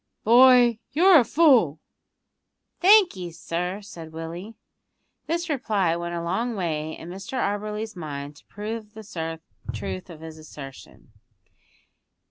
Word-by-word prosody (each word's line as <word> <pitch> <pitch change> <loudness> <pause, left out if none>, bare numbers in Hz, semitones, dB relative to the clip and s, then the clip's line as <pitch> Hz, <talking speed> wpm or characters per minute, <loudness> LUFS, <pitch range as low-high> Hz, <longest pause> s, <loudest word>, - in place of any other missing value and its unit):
"Boy, 245 0 +6
you're 350 +2 +7
a - - +4
fool!" 240 - +4 1.0
"Thank 390 0 +6
'ee, 180 -2 -6
sir," 180 +4 -4
said 165 -5 -10
Willie. 170 +7 -7 0.7
This 340 +2 -1
reply 210 - 0
went 170 0 -4
a 170 - -3
long 230 +7 -1
way 160 -4 -3
in 165 - -10
Mr 195 +6 -8
Auberly's 210 +1 -3
mind 145 -3 -6
to - - -20
prove 215 +1 -7
the 165 -7 -6 0.3
truth 100 -4 -5
of 160 -2 -11
his 160 -1 -9
assertion. 135 -5 -12
190 Hz, 125 wpm, -25 LUFS, 160-230 Hz, 1.0 s, you're